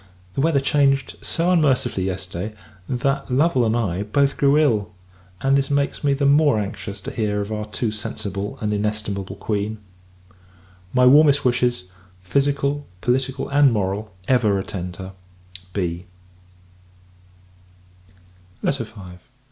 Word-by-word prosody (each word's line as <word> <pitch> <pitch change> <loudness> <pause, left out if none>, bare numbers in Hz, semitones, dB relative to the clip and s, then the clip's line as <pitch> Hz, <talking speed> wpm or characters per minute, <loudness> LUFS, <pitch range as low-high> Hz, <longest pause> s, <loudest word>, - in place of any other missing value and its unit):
The - - -1
weather 155 -2 +3
changed 135 -1 +2
so 170 +2 +1
unmercifully, 130 - +2
yesterday, 95 +2 -4 0.3
that 135 +3 -1
Lovel 135 0 +3
and 110 +2 +1
I 100 -5 -1
both 135 +7 +1
grew 140 +1 +3
ill; 110 -9 +2 0.5
and 135 +1 +3
this 135 -1 +1
makes 140 +1 0
me 140 -1 +3
the 140 +1 0
more 145 -2 +5
anxious 100 0 -5
to - - -5
hear 105 -2 -1
of 100 +1 -4
our 105 0 -3
too 105 +2 -2
sensible 100 -1 -5
and 105 -1 0
inestimable 105 -2 -2
Queen. 105 +1 -2 1.1
My 125 0 +4
warmest 145 +2 +6
wishes 120 -6 +1 0.3
physical, 140 +5 0
political, 130 +1 0
and 140 -1 +5
moral 105 0 -2 0.2
ever 115 -6 +3
attend 90 -2 -5
her. 95 +2 -8 0.6
B. 90 -2 -3
120 Hz, 125 wpm, -22 LUFS, 100-140 Hz, 1.1 s, warmest